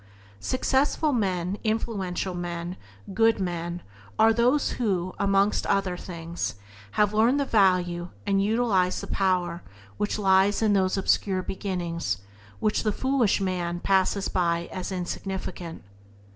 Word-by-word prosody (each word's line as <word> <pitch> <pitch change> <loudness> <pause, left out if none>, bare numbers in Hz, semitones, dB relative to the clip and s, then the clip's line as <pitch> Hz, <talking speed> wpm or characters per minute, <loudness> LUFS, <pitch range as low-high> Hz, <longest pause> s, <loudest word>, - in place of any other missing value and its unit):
Successful 275 - +1
men, 190 -4 -1
influential 200 -5 -2
men, 175 0 -4 0.4
good 225 +1 +3
men 175 -1 -3 0.3
are 225 0 +5
those 245 +5 +2
who, 185 -5 0
amongst 200 +1 +2
other 195 -2 +1
things, 170 - -5 0.4
have 210 0 +2
learned 230 +6 +3
the 280 - +1
value 180 -5 +2 0.2
and 195 -1 +2
utilized 205 -4 +1
the - - -6
power 180 -3 0 0.4
which 210 - -1
lies 195 0 +3
hidden 215 -2 +3
in 195 - +4
those 185 +1 0
obscure 190 -1 +1
beginnings 175 - -3 0.4
which 210 - +1
the 215 - +1
foolish 260 -2 +1
man 175 -3 -2
passes 195 +1 +1
by 170 -1 0
as 185 +1 -5
"insignificant." 180 -1 -5
190 Hz, 130 wpm, -26 LUFS, 175-210 Hz, 0.4 s, are